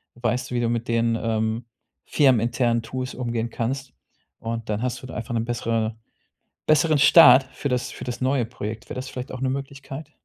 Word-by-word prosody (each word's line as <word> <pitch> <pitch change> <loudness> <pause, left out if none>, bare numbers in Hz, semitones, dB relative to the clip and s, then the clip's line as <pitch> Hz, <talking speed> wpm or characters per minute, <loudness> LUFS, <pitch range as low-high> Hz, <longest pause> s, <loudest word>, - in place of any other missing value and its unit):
Weißt 120 +2 -1
du, - - -2
wie - - +1
du 115 - +1
mit 115 0 -2
den, 115 0 +1
ähm, 110 0 -1 0.4
firmeninternen 120 -3 +2
Tools 130 +2 -5
umgehen 120 -2 -2
kannst. 130 +4 -3 0.5
Und 115 -1 -5
dann 105 0 -1
hast 125 0 -2
du 130 - -8
einfach 120 0 -5
'ne 115 - +1
bessere 115 -1 -1 0.7
besseren 155 0 +4
Start 140 -2 +8
für 145 - -3
das 125 -2 -1
für - - -9
das 125 -1 -5
neue 130 -1 +1
Projekt. 110 -2 -6
Wäre - - -5
das 130 +1 -5
vielleicht 125 0 -7
auch 130 - -6
'ne 130 -1 0
Möglichkeit? 140 +2 -6
120 Hz, 185 wpm, -24 LUFS, 115-130 Hz, 0.7 s, Start